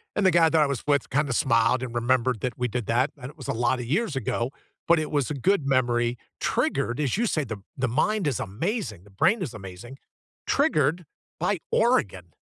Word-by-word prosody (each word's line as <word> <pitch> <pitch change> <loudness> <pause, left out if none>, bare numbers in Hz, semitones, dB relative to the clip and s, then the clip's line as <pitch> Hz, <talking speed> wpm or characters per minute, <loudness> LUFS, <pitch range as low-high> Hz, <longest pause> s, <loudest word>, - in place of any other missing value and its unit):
and 210 - +1
the 175 -2 +4
guy 165 - +6
that 160 -1 +3
I - - -1
was 120 - -6
with 140 -3 +2
kinda 140 -1 +1
smiled 115 0 +3
and 125 - -4
remembered 125 -1 +1
that 125 -2 -1
we 125 - +2
did 120 -1 -3
that, 120 +5 +2
and 125 - -7
it - - -24
was 130 - -7
a - - 0
lotta 125 0 +1
years 220 -10 -2
ago, 135 -6 -1 0.5
but 170 -1 +5
it 155 - -3
was 145 -1 +1
a 140 -4 -4
good 195 -8 +2
memory, 120 -3 +2 0.3
triggered, 120 +4 0
as 130 - 0
you 235 - +1
say, 155 -9 0
the 110 -5 -6 0.3
the 120 - -2
mind 215 -5 -1
is 135 -7 0
amazing! 120 - -3
The 95 -1 -21
brain 220 +4 +4
is 150 - -4
amazing 95 +6 -9 0.6
triggered 155 +2 +2 0.4
by 180 +5 +1 0.2
Oregon, 100 - +1
130 Hz, 215 wpm, -26 LUFS, 120-155 Hz, 0.6 s, guy